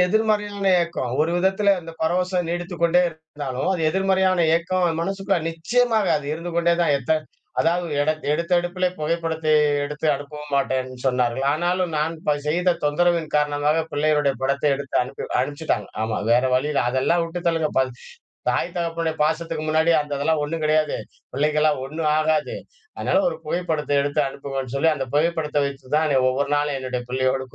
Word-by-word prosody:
எதிர்மறையான 210 Hz, 0 st, 0 dB, 0.2 s
ஏக்கம். 170 Hz, -8 st, -3 dB
ஒரு 160 Hz, +2 st, +2 dB
விதத்தில 190 Hz, +2 st, +3 dB
இந்த 165 Hz, -1 st, -10 dB
பரவசம் 180 Hz, +2 st, 0 dB
நீடித்துக் 175 Hz, 0 st, -4 dB
கொண்டே 170 Hz, +1 st, +4 dB
இருந்தாலும், 150 Hz, -5 st, -5 dB
அது 180 Hz, -, -2 dB
எதிர்மறையான 190 Hz, -1 st, +2 dB
ஏக்கம் 180 Hz, +2 st, 0 dB, 0.2 s
மனசுக்குள்ள 195 Hz, +1 st, -1 dB
நிச்சியமாக 220 Hz, +6 st, +1 dB
அது 145 Hz, -, -9 dB
இருந்து 170 Hz, +2 st, -6 dB
கொண்டே 170 Hz, 0 st, +3 dB
தான் 150 Hz, -, +3 dB
எத்த 135 Hz, -, -8 dB, 0.5 s
அதாவது 170 Hz, 0 st, 0 dB
எடத் 155 Hz, +1 st, 0 dB
எடுத்த 170 Hz, +3 st, +1 dB
எடுப்பிலே 180 Hz, +1 st, -1 dB
புகைப்படத்தை 160 Hz, 0 st, -1 dB, 0.3 s
எடுத்து 150 Hz, +2 st, -4 dB
அனுப்பவும் 150 Hz, +1 st, -8 dB
மாட்டேன்னு 130 Hz, -2 st, -1 dB
சொன்னார்கள். 125 Hz, 0 st, +1 dB
ஆனாலும் 175 Hz, +2 st, 0 dB
நான் 160 Hz, +2 st, 0 dB
ப 150 Hz, -, +4 dB, 0.2 s
செய்த 175 Hz, +2 st, +2 dB
தொந்தரவின் 165 Hz, +1 st, +1 dB
காரணமாக 150 Hz, +2 st, +1 dB
பிள்ளையுடைய 145 Hz, -1 st, +2 dB
படத்தை 140 Hz, +2 st, +1 dB
எடுத்து 140 Hz, -1 st, -8 dB
அனுப்பி 130 Hz, +2 st, -7 dB, 0.2 s
அனுப்பிச்சுட்டாங்க. 145 Hz, +4 st, -2 dB
ஆமா. 110 Hz, 0 st, -1 dB, 0.2 s
வேற 120 Hz, +1 st, +4 dB
வழி 130 Hz, +4 st, +1 dB
இல்ல. -, -, +2 dB
அதெல்லாம் 135 Hz, +7 st, +1 dB
வுட்டுத் 170 Hz, +1 st, -5 dB
தள்ளுங்க. 165 Hz, -2 st, +1 dB
பல் 130 Hz, -1 st, +1 dB, 0.6 s
தாய் 170 Hz, -, -1 dB
தகப்பனுடைய 165 Hz, -1 st, -1 dB
பாசத்துக்கு 160 Hz, 0 st, -1 dB
முன்னாடி 160 Hz, +2 st, +3 dB
அந்த 145 Hz, -1 st, -6 dB
இதெல்லாம் 150 Hz, +1 st, +1 dB
ஒண்ணும் 155 Hz, +2 st, -3 dB
கிடையாது. 155 Hz, 0 st, +2 dB, 0.4 s
பிள்ளைக்கலாம் 150 Hz, 0 st, +2 dB
ஒண்ணும் 155 Hz, +2 st, -2 dB
ஆகாது. 155 Hz, -1 st, 0 dB, 0.4 s
அதனால 295 Hz, -, +1 dB
ஒரு -, -, -4 dB
புகைப்படத்தை 155 Hz, -4 st, -1 dB
எடுத்து 145 Hz, +1 st, 0 dB
அனுப்புங்கன்னு 135 Hz, -1 st, -5 dB
சொல்லி, 160 Hz, +4 st, +3 dB
அந்த 135 Hz, -2 st, -4 dB
புகைப்படத்தை 150 Hz, -2 st, +1 dB
வச்சு 140 Hz, 0 st, -6 dB
தான் 155 Hz, -2 st, +2 dB
ஒவ்வொரு 140 Hz, +2 st, -1 dB
நாளும் 145 Hz, -1 st, 0 dB
என்னுடைய 130 Hz, -1 st, -3 dB
பிள்ளையோடு 130 Hz, +1 st, 0 dB
155 Hz, 155 wpm, -23 LUFS, 145-175 Hz, 0.6 s, கொண்டே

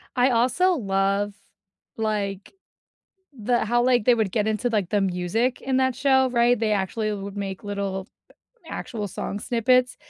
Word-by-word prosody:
I 250 Hz, +1 st, +4 dB
also 255 Hz, +10 st, +3 dB
love, 200 Hz, -3 st, 0 dB, 0.6 s
like, 205 Hz, -3 st, -3 dB, 0.8 s
the 240 Hz, +2 st, 0 dB
how, 240 Hz, +2 st, +2 dB
like, 245 Hz, -3 st, +3 dB
they 245 Hz, -, +5 dB
would 220 Hz, -5 st, 0 dB
get 210 Hz, +1 st, 0 dB
into, 220 Hz, +2 st, 0 dB
like, 205 Hz, -6 st, 0 dB
the 205 Hz, -1 st, +1 dB
music 195 Hz, +7 st, -1 dB
in 265 Hz, -1 st, 0 dB
that 260 Hz, -1 st, +1 dB
show, 265 Hz, -2 st, +3 dB
right? 240 Hz, 0 st, +3 dB
They 220 Hz, -1 st, 0 dB
actually 210 Hz, +2 st, -1 dB
would 200 Hz, 0 st, -6 dB
make 195 Hz, -1 st, -5 dB
little 200 Hz, -1 st, -4 dB, 0.6 s
actual 210 Hz, -4 st, -5 dB
song 200 Hz, +2 st, -5 dB
snippets, 250 Hz, +2 st, +2 dB
215 Hz, 155 wpm, -24 LUFS, 200-245 Hz, 0.8 s, they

